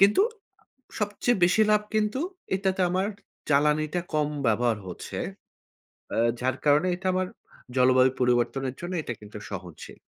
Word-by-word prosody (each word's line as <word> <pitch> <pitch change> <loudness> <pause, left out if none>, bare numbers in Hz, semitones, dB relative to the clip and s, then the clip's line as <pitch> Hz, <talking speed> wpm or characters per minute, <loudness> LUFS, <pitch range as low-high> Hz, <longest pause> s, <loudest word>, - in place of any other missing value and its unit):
কিন্তু 200 - +6 0.8
সবচেয়ে 210 +1 0
বেশি 180 +5 +3
লাভ 210 0 +4
কিন্তু 215 +4 +1 0.4
এটাতে 190 -1 0
আমার 185 +2 +1 0.4
জ্বালানিটা 150 +4 +2
কম 150 -1 +2 0.2
ব্যবহার 115 0 +2
হচ্ছে। 90 - -6 1.0
আ - - -2 0.2
যার 130 +1 0
কারণে 150 +4 +4
এটা 190 +1 -7
আমার 185 0 0 0.5
জলবায়ু 130 0 +5
পরিবর্তনের 125 +2 +1
জন্য 175 +2 -5
এটা 120 - -4
কিন্তু 105 0 -9
সহজশীল। 90 -5 -8
150 Hz, 130 wpm, -27 LUFS, 125-190 Hz, 1.0 s, কিন্তু